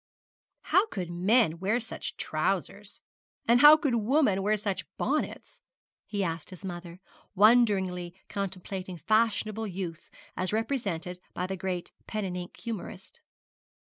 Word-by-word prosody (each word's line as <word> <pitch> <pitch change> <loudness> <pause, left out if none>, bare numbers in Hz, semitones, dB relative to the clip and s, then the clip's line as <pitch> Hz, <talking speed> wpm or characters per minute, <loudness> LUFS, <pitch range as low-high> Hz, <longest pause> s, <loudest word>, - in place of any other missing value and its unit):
'How 395 +4 +3
could 180 - -5
men 180 -1 +3
wear 205 +6 +1
such 225 -1 -6
trousers? - - -2 0.5
and 240 +1 +5
how 300 +1 +10
could 290 -5 0
women 230 -3 +2
wear 210 +2 +2
such 200 -1 -2
bonnets?' - - -2 0.5
he 200 -2 -1
asked 165 -2 -3
his 185 +1 -10
mother, 175 -1 -7 0.4
wonderingly 195 -5 +4
contemplating 190 -1 -5
fashionable 220 +2 +1
youth 180 -3 -6 0.3
as 185 0 -1
represented 205 -7 -2 0.2
by 180 - -1
the 190 +1 -3
great 185 -1 -4 0.2
pen 215 -2 -2
and 180 -1 -4
ink 180 -1 -7
humourist. 235 - -7
195 Hz, 130 wpm, -29 LUFS, 180-225 Hz, 0.5 s, how